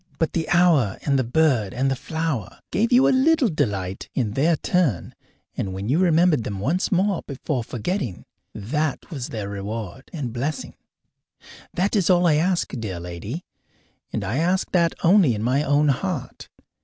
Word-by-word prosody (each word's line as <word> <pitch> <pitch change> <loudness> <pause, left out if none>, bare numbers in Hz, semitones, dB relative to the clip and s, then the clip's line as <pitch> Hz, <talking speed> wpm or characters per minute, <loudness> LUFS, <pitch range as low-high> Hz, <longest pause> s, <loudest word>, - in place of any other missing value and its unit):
But 160 - 0
the 160 -2 -2
hour 170 - +3
and 140 -2 +2
the - - +2
bird 125 -5 +1
and 135 +2 +1
the - - +1
flower 160 - -3
gave 230 +4 +1
you 250 +2 +6
a - - +4
little 270 -1 +3
delight 100 - -2
in 115 -6 0
their 155 +9 +2
turn, 155 - 0 0.4
and 95 - -3
when 100 +3 -4
you 150 +6 +2
remembered 170 -6 +3
them 100 -2 -4
once 160 - 0
before 165 - -1
forgetting, 120 - -4 0.3
that 145 - -3
was 135 -6 -4
their 105 -3 -4
reward 100 +3 -6
and 135 -8 -4
blessing. 140 +5 -3 1.0
That 195 +5 +1
is 195 -4 +2
all 180 -1 +4
I 155 -3 +4
ask, 175 +2 +1
dear 105 -8 -4
lady, 90 - -6 0.7
and - - -2
I 120 - -2
ask 180 +4 +1
that 170 -2 +2
only 170 - +5
in 105 - -4
my 130 +4 +2
own 145 0 +2
heart. 140 -1 -3
145 Hz, 165 wpm, -23 LUFS, 115-175 Hz, 1.0 s, you